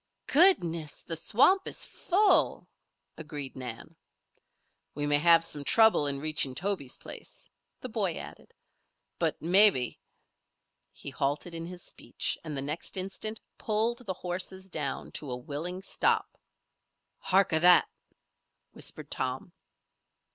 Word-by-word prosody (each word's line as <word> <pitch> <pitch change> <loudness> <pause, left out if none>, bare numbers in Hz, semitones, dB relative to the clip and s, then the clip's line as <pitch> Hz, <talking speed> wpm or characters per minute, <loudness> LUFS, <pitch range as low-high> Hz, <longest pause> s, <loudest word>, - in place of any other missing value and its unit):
"Goodness! 170 - +3
The 165 - -3
swamp 255 - +3
is - - -3
full," 395 +2 +2 0.5
agreed 145 -3 -6
Nan. 125 -3 -8 1.0
"We 145 0 -2
may 145 0 +3
have 165 +1 +5
some 150 -3 -4
trouble 220 -4 +4
in 140 -1 0
reaching 150 -3 0
Toby's 175 -5 -2
place," - - -10 0.3
the - - -5
boy - - -1
added. - - -10 0.7
"But - - 0
maybe 180 - +5 0.5
" - - -53
He 140 - -5
halted 145 +6 -2
in 165 0 -5
his 180 0 -8
speech, - - -3
and 155 -3 -5
the 135 - -2
next 150 +7 -4
instant 195 +4 -3 0.2
pulled 225 +2 0
the 190 - -1
horses 185 +1 -5
down 150 -6 -4
to 145 - -8
a 125 - -3
willing 160 +9 -5
stop. - - 0 0.8
"Hark 190 -2 +2
a 160 - +4
that!" 175 +1 +6 0.8
whispered - - -7
Tom. 130 +7 -3
165 Hz, 130 wpm, -29 LUFS, 145-195 Hz, 1.0 s, that